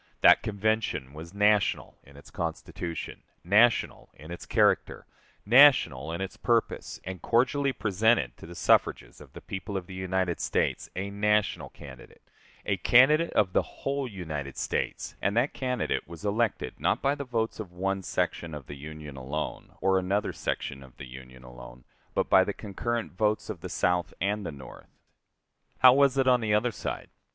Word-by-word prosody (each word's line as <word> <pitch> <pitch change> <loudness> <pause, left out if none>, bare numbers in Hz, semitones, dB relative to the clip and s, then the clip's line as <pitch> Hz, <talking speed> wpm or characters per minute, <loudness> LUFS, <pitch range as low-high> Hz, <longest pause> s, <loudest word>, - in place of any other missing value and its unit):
That - - +7
Convention 110 -9 -1
was 80 +2 -9
national 105 0 +1
in 70 0 -17
its 70 - -15
constitution, 85 0 -5 0.2
national 105 - +3
in 75 +4 -12
its 85 - -8
character, - - +1 0.4
national 105 - +5
in 85 - -4
its 95 - -5
purpose, 115 -2 -1
and 95 -1 -7
cordially 135 +4 +2
presented 105 - +1
to - - -12
the 85 - -10
suffrages - - +1
of - - -15
the - - -10
people 95 +1 -5
of 90 - -5
the 95 - -11
United 95 -1 -1
States - - -1
a 100 +2 -4
national 105 +1 0
candidate, 65 -4 -14 0.4
a 100 - 0
candidate 135 - +5
of 95 -4 +2
the - - +4
whole 140 -1 -4
United 80 - -6
States; - - -3
and 100 +3 0
that 125 +5 +2
candidate 125 -3 -2
was 85 +2 -10
elected 110 +2 -1
not - - +1
by 140 +1 +3
the 145 -1 -5
votes 115 -4 -2
of 100 -5 -7
one 95 +2 -2
section 85 -3 -2
of 70 -3 -9
the 70 - -9
Union 75 0 -9
alone, 70 +4 -5
or 95 -1 +3
another 95 +3 -1
section 70 - -4
of 65 -2 -16
the - - -8
Union 65 0 -12
alone, - - -12 0.3
but - - +1
by - - +6
the - - -3
concurrent 115 +3 -4
votes 105 +3 -1
of 90 -6 -9
the - - -6
South 90 -1 0
and 100 0 -1
the - - -4
North. 70 -3 -12 0.9
How 130 -1 +8
was 140 0 +3
it 135 -1 +2
on 125 -1 +4
the 105 -2 +1
other 120 +3 +1
side? - - -6
95 Hz, 175 wpm, -28 LUFS, 80-115 Hz, 0.9 s, How